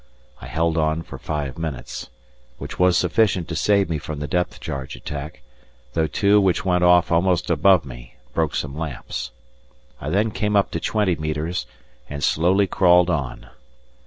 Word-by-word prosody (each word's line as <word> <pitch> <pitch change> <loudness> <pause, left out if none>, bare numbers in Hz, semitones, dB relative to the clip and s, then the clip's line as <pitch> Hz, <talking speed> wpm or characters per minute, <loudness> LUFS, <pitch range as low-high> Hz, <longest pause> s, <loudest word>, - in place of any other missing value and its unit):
I - - -8
held 80 +1 0
on 80 +1 0
for - - -10
five 75 -3 -4
minutes, 75 -8 -5 0.5
which - - -8
was 90 0 +4
sufficient 90 -1 +2
to 80 - -3
save 100 +5 +3
me 80 -2 -2
from 75 +1 -6
the 75 - -3
depth 90 +3 -1
charge 65 -2 -5
attack, 70 -2 -7 0.5
though 80 -1 +1
two 100 +5 +3
which 95 -1 +1
went 90 -1 +2
off 90 -1 +5
almost 85 +1 +2
above 85 0 +4
me - - -11 0.2
broke 80 -3 0
some 70 -1 -3
lamps. 75 -6 -5 0.7
I 70 - -4
then 105 +6 +1
came 105 0 -1
up 100 - +3
to - - -2
twenty 105 -5 +1
metres 75 +3 -3 0.4
and 70 0 -5
slowly 90 +5 +3
crawled 90 -1 +4
on. 70 -7 -3
85 Hz, 165 wpm, -22 LUFS, 75-90 Hz, 0.7 s, off